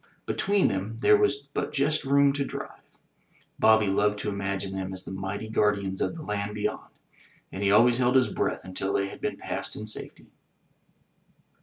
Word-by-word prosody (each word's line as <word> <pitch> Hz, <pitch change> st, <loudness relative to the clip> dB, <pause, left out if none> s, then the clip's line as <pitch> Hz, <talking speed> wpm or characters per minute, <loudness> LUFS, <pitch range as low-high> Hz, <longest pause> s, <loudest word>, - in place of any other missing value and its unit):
Between 200 Hz, 0 st, +2 dB
them 100 Hz, +3 st, -3 dB
there 210 Hz, -, +6 dB
was 140 Hz, -10 st, +1 dB
but -, -, -2 dB
just 145 Hz, +2 st, +1 dB
room 140 Hz, 0 st, +4 dB
to 140 Hz, 0 st, -1 dB
drive. -, -, -7 dB, 0.8 s
Bobby 110 Hz, -1 st, +5 dB
loved 105 Hz, +1 st, +1 dB
to 105 Hz, -, -3 dB
imagine 100 Hz, -1 st, -3 dB
them 95 Hz, 0 st, -4 dB
as 95 Hz, 0 st, -5 dB
the -, -, -7 dB
mighty 95 Hz, +3 st, -4 dB
guardians 100 Hz, -3 st, 0 dB
of -, -, -1 dB
the 160 Hz, -, -8 dB
land 105 Hz, -3 st, -3 dB
beyond, 105 Hz, -, -3 dB, 0.6 s
and 95 Hz, -, -6 dB
he 100 Hz, -1 st, +2 dB
always 120 Hz, +4 st, +5 dB
held 125 Hz, +1 st, +2 dB
his 130 Hz, -1 st, +5 dB
breath -, -, -2 dB
until 95 Hz, +1 st, -3 dB
they 100 Hz, 0 st, 0 dB
had -, -, -11 dB
been -, -, -2 dB
passed -, -, -4 dB
in 110 Hz, -, -6 dB
safety. 110 Hz, -, -4 dB
105 Hz, 180 wpm, -27 LUFS, 100-135 Hz, 0.8 s, there